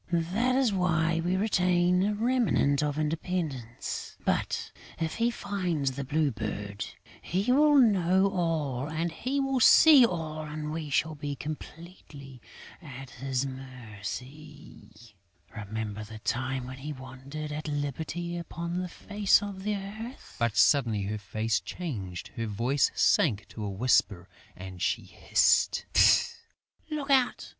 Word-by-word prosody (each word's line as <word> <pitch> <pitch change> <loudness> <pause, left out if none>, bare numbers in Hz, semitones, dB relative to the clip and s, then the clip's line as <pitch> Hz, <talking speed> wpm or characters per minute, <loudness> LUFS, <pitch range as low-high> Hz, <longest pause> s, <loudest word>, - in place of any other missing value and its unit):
That 250 +5 +2
is 260 -5 +2
why 165 -3 +1
we 180 +2 +1
retain 180 -3 +2
a 205 +2 +1
remnant 225 - +2
of 150 -1 -1
independence; 155 -6 -3
but, - - -1 0.3
if 160 -1 -2
he 230 +1 +2
finds 180 - -2
the 140 +2 -5
Blue 145 +1 +1
Bird, 105 -2 -5 0.4
he 195 +8 0
will 295 +3 +5
know 190 -7 +4
all, 155 -7 -1
he 170 - -2
will 270 -1 0
see 290 +3 +8
all 160 -7 -1
and 150 0 -5
we 155 -1 -4
shall 155 +2 +1
be 145 -1 -5
completely 150 -3 -9 0.4
at 135 -4 -10
his 130 +2 -2
mercy.... 130 -1 -9 0.4
Remember 110 0 -5
the 110 +1 -10
time 130 +3 -2
when 130 +1 -9
we 150 +2 -5
wandered 135 +3 -8
at 150 +1 -5
liberty 160 +4 -3
upon 170 +1 -4
the 180 -1 -4
face 205 +2 +2
of 200 -2 -6
the 210 +1 -1
earth!..." 215 +6 -8
But, 115 -4 0
suddenly 105 +2 +4
her 105 +2 -3
face 110 +3 -1
changed, 100 - -6
her 115 -1 -4
voice 120 +7 +1
sank 105 - +2
to 110 - -7
a 105 - -2
whisper 100 -3 +1 0.3
and 95 -1 -9
she - - 0
hissed, - - +2 1.0
"Look 295 -2 -3
out! 260 -2 +2
150 Hz, 135 wpm, -28 LUFS, 125-180 Hz, 1.0 s, see